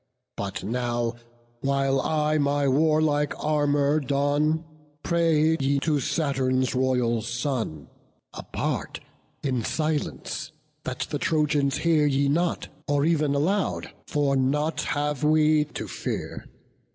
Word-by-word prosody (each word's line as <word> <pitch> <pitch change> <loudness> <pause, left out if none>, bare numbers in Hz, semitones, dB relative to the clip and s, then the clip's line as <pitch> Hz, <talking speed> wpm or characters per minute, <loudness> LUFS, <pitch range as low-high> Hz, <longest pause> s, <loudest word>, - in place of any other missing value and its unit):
But 100 -1 -4
now, 120 +1 -1 0.5
while 135 0 +1
I 155 0 +1
my 145 0 +1
warlike 150 +1 +2
armour 145 -1 +2
don, 145 +3 +1 0.4
Pray 160 -2 +3
ye 140 +1 +1
to 150 -2 +1
Saturn's 130 -3 0
royal 125 -3 +1
son, 120 - -3 0.5
apart, - - -3 0.4
In 130 -4 0
silence, 155 +4 -2 0.3
that - - -4
the - - -1
Trojans 150 -3 +1
hear 160 -3 +3
ye 140 0 +2
not; 170 +4 0 0.2
Or 145 0 +2
ev'n 155 -3 +2
aloud, 185 +8 0 0.2
for 145 -2 +1
nought 145 +4 +1
have 145 -1 -2
we 155 0 +4
to 150 - -7
fear. - - -5
145 Hz, 115 wpm, -25 LUFS, 135-155 Hz, 0.5 s, we